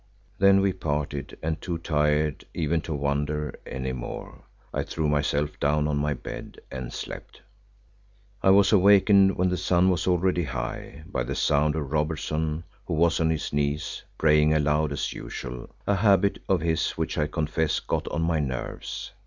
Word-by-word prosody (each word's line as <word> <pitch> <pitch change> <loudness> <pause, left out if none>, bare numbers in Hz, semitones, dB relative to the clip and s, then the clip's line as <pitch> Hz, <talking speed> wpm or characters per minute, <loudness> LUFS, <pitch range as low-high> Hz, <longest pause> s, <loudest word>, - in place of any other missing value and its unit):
Then 100 0 +6
we 95 -1 +2
parted, 75 -4 -3
and 80 0 -2
too 85 -2 -3
tired 75 -2 +1
even 80 0 0
to 80 - -4
wonder 75 +1 -2
any 65 -1 -3
more, 60 -1 -7 0.3
I - - 0
threw 80 -2 -2
myself 75 0 0
down 75 +1 +2
on 75 -1 0
my 75 0 0
bed - - -8
and 65 -2 -5
slept. - - -8 1.0
I - - +4
was 100 0 +6
awakened 100 0 +6
when 90 +1 +2
the 90 - 0
sun 90 +1 +3
was 90 - -1
already 90 -1 +2
high, 65 +3 -5
by 60 - -3
the 65 +3 -3
sound 75 +1 +2
of 75 -3 -3
Robertson, 75 +1 -1 0.2
who 85 - -1
was 85 +1 +3
on 80 -1 +2
his 80 -3 -2
knees, 75 +2 -1 0.2
praying 75 0 +4
aloud 75 0 +2
as 70 - -2
usual, 60 0 -7 0.2
a 100 - +2
habit 100 -1 +3
of 95 -4 +3
his 80 0 +1
which - - -2
I 75 - +2
confess 75 0 0
got - - -2
on 80 +2 -1
my 80 -1 +1
nerves. 65 -4 -4
75 Hz, 170 wpm, -26 LUFS, 75-85 Hz, 1.0 s, Then